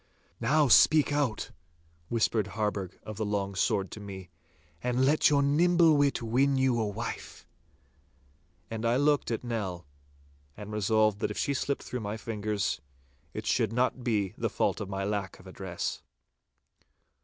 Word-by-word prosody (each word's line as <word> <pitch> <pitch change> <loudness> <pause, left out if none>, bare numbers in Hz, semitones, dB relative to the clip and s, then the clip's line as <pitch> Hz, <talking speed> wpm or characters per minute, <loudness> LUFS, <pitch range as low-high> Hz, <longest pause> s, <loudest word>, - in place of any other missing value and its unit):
'Now 150 +5 +3
speak 150 +5 +6
out,' 140 -7 -1 0.6
whispered 110 -2 +1
Harburgh 100 -4 -2
of 110 -1 -8
the 110 - -1
Long 100 -1 -1
Sword 95 0 0
to - - -8
me, 95 -3 -9 0.5
'and 125 +1 +1
let 150 +3 +4
your 140 -1 +3
nimble 165 +2 +4
wit 140 -3 +2
win 135 +4 +2
you 130 -3 +2
a 110 - 0
wife.' 110 +3 -6 1.3
And 110 0 -4
I 115 +1 +2
looked 145 +2 +2
at 115 0 -2
Nell, 100 -7 -4 0.7
and 105 0 -8
resolved 105 0 +2
that - - -1
if - - -6
she 140 - 0
slipped 140 +1 -2
through 125 - -4
my 105 0 -4
fingers, 105 -6 -2 0.5
it - - -5
should 110 - +1
not 125 +1 0
be 105 -6 0
the - - 0
fault - - 0
of 100 - -5
my 95 0 -3
lack 100 -1 -3
of 95 - -17
address. 95 -1 -5
110 Hz, 155 wpm, -29 LUFS, 100-130 Hz, 1.3 s, speak